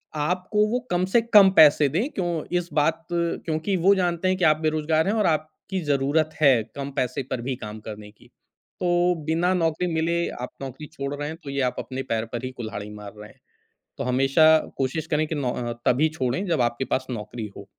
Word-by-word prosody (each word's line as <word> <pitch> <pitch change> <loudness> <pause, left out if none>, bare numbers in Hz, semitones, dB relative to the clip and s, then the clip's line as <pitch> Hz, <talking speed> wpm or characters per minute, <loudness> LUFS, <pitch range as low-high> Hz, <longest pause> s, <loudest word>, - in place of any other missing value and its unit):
आपको 180 +7 0
वो 245 +3 0
कम 180 +1 +2
से 230 +5 +3
कम 210 -4 +7
पैसे 150 -1 +7
दें। 205 - -1
क्यों 175 -4 -2 0.2
इस 175 - -7
बात 160 +2 +1
क्योंकि 170 +1 -1
वो 190 +4 +5
जानते 180 -1 0
हैं 185 0 +1
कि 180 - +2
आप 155 0 +5
बेरोज़गार 155 +1 +1
हैं 205 - +2
और 215 - +1
आपकी 155 +4 -2
ज़रूरत 145 +3 +2
है, 130 -7 +5
कम 140 0 -5
पैसे 130 +1 -1
पर 125 - -2
भी 130 +2 -3
काम 110 -2 -8
करने 105 -1 -9
की। 105 - -22 0.5
तो 175 0 +2
बिना 170 +4 +1
नौकरी 165 0 0
मिले 165 +1 0 0.2
आप 125 - -4
नौकरी 135 +3 -7
छोड़ 140 -1 -4
रहे 145 0 -4
हैं, 160 - -7
तो 140 - -7
ये 140 - -1
आप 125 - -13
अपने 130 0 -5
पैर 110 0 -1
पर 120 +2 -3
ही 130 - -4
कुल्हाड़ी 110 -3 -6
मार 105 0 -9
रहे 105 0 -10
हैं। - - -21 0.6
तो - - -2
हमेशा 135 +5 +5 0.2
कोशिश 140 +4 -1
करें 155 0 0
कि 160 - -3
नो 135 -4 -1
अ, 120 -1 -3
तभी 145 +6 +3
छोड़े 130 +8 0
जब 165 -6 +1
आपके 120 +2 -1
पास 130 - -2
नौकरी 110 -1 -5
हो। 100 - -10
155 Hz, 215 wpm, -24 LUFS, 130-170 Hz, 0.6 s, कम